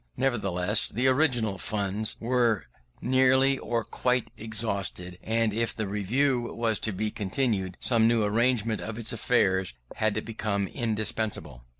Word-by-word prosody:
Nevertheless, 105 -6 +1
the 120 +5 -1
original 125 - +2
funds 105 +1 -1
were 120 -2 +1 0.4
nearly 130 +1 +3
or 115 -1 -2
quite 125 +1 -1
exhausted, 100 -5 -2
and 115 -1 0
if 115 +1 0
the 110 -2 -3
Review 120 +5 0
was 115 -2 0
to 110 - 0
be 105 +3 -2
continued 95 -3 -2
some 115 -2 +3
new 115 -1 +2
arrangement 115 0 +1
of 110 0 -6
its 115 -1 -2
affairs 95 - +1 0.2
had 110 0 0
become 105 -3 -2
indispensable. 110 - -2
110 Hz, 130 wpm, -27 LUFS, 100-120 Hz, 0.4 s, nearly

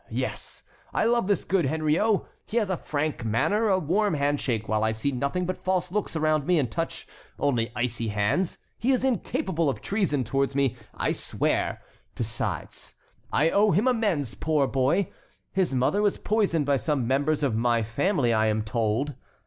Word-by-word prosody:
Yes, - - -4 0.3
I - - +2
love 235 -3 +2
this 200 -4 +1
good 185 -3 +2
Henriot. 160 +9 +2 0.3
He 225 - -2
has 210 -5 +1
a 185 - 0
frank 150 -4 -2
manner, 200 - +1
a 190 -2 +3
warm 185 +2 +1
handshake, 140 -6 0
while 110 0 +1
I 110 0 +2
see 110 +6 -1
nothing 140 +8 -1
but 185 +1 -4
false 180 -1 0
looks 205 -3 -2
around 155 -2 +1
me, 180 -1 +4
and 130 -7 0
touch, 165 +7 -3 0.3
only 120 -6 0
icy 120 -1 -1
hands. 110 - 0 0.2
He 240 - 0
is 255 -1 +1
incapable 220 - 0
of 135 - -3
treason 190 -10 0
towards 135 +3 0
me, 140 -3 +2 0.2
I - - 0
swear. - - -1 0.3
Besides, 115 -1 -4 0.4
I 160 +2 +3
owe 210 +1 +4
him 205 +8 +2
amends, 205 - +1
poor 155 -3 +1
boy! 135 +8 +1 0.4
His 185 -8 0
mother 130 +11 +2
was 205 -1 +2
poisoned 200 -8 +1
by 140 0 +3
some 130 +2 -1
members 145 +4 +1
of 130 -6 +1
my 115 0 +2
family, 125 - +1
I 110 0 +3
am 110 0 +1
told. 115 +5 -1
150 Hz, 175 wpm, -26 LUFS, 125-190 Hz, 0.4 s, me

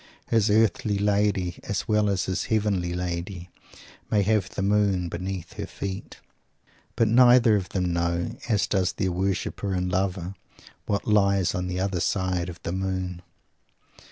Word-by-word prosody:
His 115 -3 +3
Earthly 110 0 +2
Lady, 100 -3 +1
as 100 - -3
well 105 -1 +2
as 95 -3 0
his 95 - -2
Heavenly 100 -5 0
Lady, 90 0 -4 0.6
may 105 -2 +3
have 105 -2 +1
the 95 - -4
moon 100 -3 +2
beneath 90 +1 -5
her - - -3
feet. 95 -1 -6 0.8
But 115 - +3
neither 120 -1 +6
of 95 -3 -2
them 90 -2 -1
know, 85 +5 -1
as 105 -3 +2
does 95 -2 0
their 95 - -1
worshiper 95 +2 -2
and 90 0 -1
lover, 95 -1 -1 0.6
_what 100 -1 +1
lies 100 -3 +2
on 90 0 -2
the 90 0 -3
other 95 -1 -1
side 90 0 0
of 85 -1 -9
the - - -3
moon. 95 -1 -3
95 Hz, 155 wpm, -25 LUFS, 90-105 Hz, 0.8 s, neither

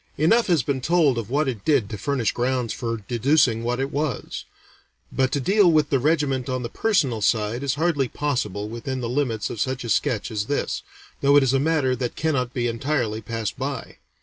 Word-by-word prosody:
Enough 225 +11 +3
has 170 -8 +3
been 135 0 -1
told 155 -5 +3
of 110 -2 -6
what 145 +3 +1
it 115 -7 -3
did 140 -9 +2
to - - -3
furnish 140 -7 0
grounds 125 -2 -1
for 115 -1 -3
deducing 125 -1 +2
what 120 +1 -1
it 135 +1 -2
was; 150 -2 -3 0.7
but 130 -1 +1
to 140 - 0
deal 195 +5 +4
with 155 -2 +2
the 135 - +3
regiment 140 -3 +1
on 130 -1 -2
the 120 - -4
personal 140 - +1
side 110 +2 +1
is 140 -1 0
hardly 150 -4 +1
possible 105 -9 -2
within 120 +4 -4
the 120 - -2
limits 120 -4 -1
of 110 - -4
such 130 -1 -1
a 120 - -5
sketch 115 -2 0
as 105 -1 -2
this, 145 - -1 0.4
though 140 +1 +4
it 145 - +6
is 135 -1 +2
a 135 - +3
matter 145 -3 +1
that 125 -1 -3
cannot 140 -6 0
be 120 -1 -2
entirely 115 -2 -1
passed 110 0 -4
by. 135 -2 -4
130 Hz, 205 wpm, -23 LUFS, 115-145 Hz, 0.7 s, it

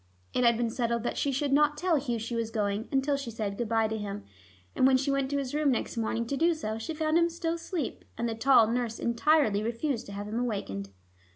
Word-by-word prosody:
It 250 - +1
had 235 -1 +5
been 235 -1 0
settled 235 -1 -1
that - - -2
she 280 - 0
should 275 +1 0
not 295 +1 +4
tell 355 +1 +2
Hugh 250 -4 -1
she 230 +2 -5
was 230 -1 -1
going, 210 -1 -2
until 275 +1 +1
she 275 -3 -5
said 210 -3 -3
good 230 +1 -3
by 225 -1 +2
to 220 0 -3
him, 205 0 -5 0.5
and 260 - +5
when 265 -1 +5
she 275 +2 0
went 275 -1 0
to 285 - 0
his 275 -2 -3
room 300 -1 +2
next 250 - -1
morning 230 0 -1
to 275 - -2
do 330 +3 +3
so, 220 -7 -4
she 310 +8 -5
found 310 +1 +2
him 340 0 +3
still 335 0 -2
asleep, 335 -3 -4
and 235 - -1
the 230 - -1
tall 235 0 +5
nurse 230 0 -1
entirely 235 -3 +2
refused 235 +3 -2
to - - -8
have 205 +1 -5
him 220 +3 -2
awakened. 195 - -3
240 Hz, 250 wpm, -29 LUFS, 225-285 Hz, 0.5 s, had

